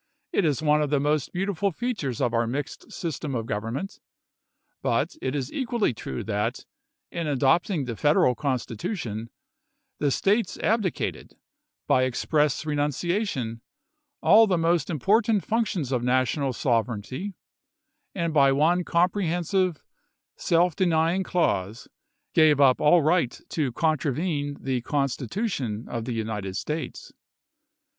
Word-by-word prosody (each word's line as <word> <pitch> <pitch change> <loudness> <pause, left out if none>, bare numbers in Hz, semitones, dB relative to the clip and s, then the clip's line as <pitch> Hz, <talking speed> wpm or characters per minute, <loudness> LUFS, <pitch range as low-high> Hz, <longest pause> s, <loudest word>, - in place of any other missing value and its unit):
It 200 - +2
is 150 -1 0
one 150 0 +4
of 150 - 0
the 150 - +2
chap.vii. 140 - -1
most 150 -3 -1
beautiful 195 +1 -1
features 180 - -3
of 120 - +1
our 115 0 +1
mixed 135 +4 -5
system 150 -4 -4
of 115 -2 -2
gov 105 -2 -2
ernment; 130 - -5 0.8
but - - 0
it 130 +2 -2
is 135 -2 -3
equally 240 - 0
true 65 - -5
that, 105 -1 -2 0.5
in 170 -2 -3
adopting 145 +4 +2
the 120 -2 -4
Federal 145 -1 +3
Constitution, 125 - -3 0.7
the 145 - +2
States 205 - +1
abdicated, 210 -6 -1 0.5
by 130 - +3
ex 130 -2 -3
press 150 -1 +1
renunciation, 145 - -1 0.6
all 220 +2 +7
the 185 -3 +2
most 165 -2 +1
important 205 - +2
functions 210 - -1
of 125 -2 +1
National 130 +2 +1
sovereignty, 120 - -2 0.8
and 170 -3 -1
by 140 -3 +5
one 165 +6 +3
comprehensive, 175 0 0 0.5
self 170 -1 +2
denying 170 0 +2
clause 115 - -1 0.5
gave 155 -3 +5
up 135 -3 +5
all 155 +2 +5
right 155 -5 +1
to 145 -6 -1
contravene 150 0 -1
the 130 -2 -2
Constitution 135 - -2
of 115 -2 -4
the 125 - -3
United 105 -4 -3
States. 160 - -5
150 Hz, 130 wpm, -26 LUFS, 125-180 Hz, 0.8 s, all